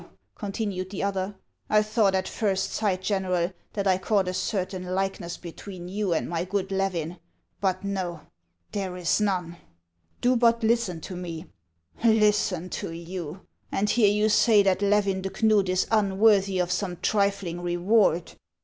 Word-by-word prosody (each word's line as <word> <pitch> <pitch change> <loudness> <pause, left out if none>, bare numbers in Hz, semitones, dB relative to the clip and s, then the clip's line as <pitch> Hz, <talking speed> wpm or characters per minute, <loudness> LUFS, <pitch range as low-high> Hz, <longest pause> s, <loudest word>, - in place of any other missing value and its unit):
" - - -47
continued 200 -3 -3
the 195 -1 -4
other; 200 0 -2 0.2
" - - -52
I 215 0 +4
thought 215 -2 +2
at 190 0 0
first 195 -4 -1
sight, 190 -4 -1
General, 185 -3 0 0.2
that 200 -2 -2
I 190 -1 +3
caught 195 -1 +1
a 185 - -1
certain 185 -1 -2
likeness 185 -1 -2
between 175 +1 -9
you 200 0 -1
and 165 - 0
my 170 0 -2
good 195 +1 -2
Levin; 180 -3 -2 0.4
but 190 -1 0
no! 185 -5 -3 0.5
there 190 -3 -3
is 180 +3 +1
none." 180 -4 -1 0.3
" 85 0 -43
Do 250 +1 +3
but 235 -1 +3
listen 220 -7 +1
to 185 - -7
me 170 -2 -6 0.3
— 80 - -22
"Listen 210 -5 +3
to - - -4
you! 170 +1 -6 0.3
and 210 +1 +1
hear 220 -4 +4
you 210 +1 +2
say 215 -1 +5
that 190 0 +2
Levin 200 -1 +2
de 195 - -3
Knud 205 0 +2
is 185 0 +2
unworthy 200 -2 +3
of 180 0 0
some 180 -1 -2
trilling 200 -4 0
reward 175 0 +2
190 Hz, 165 wpm, -26 LUFS, 180-205 Hz, 0.5 s, say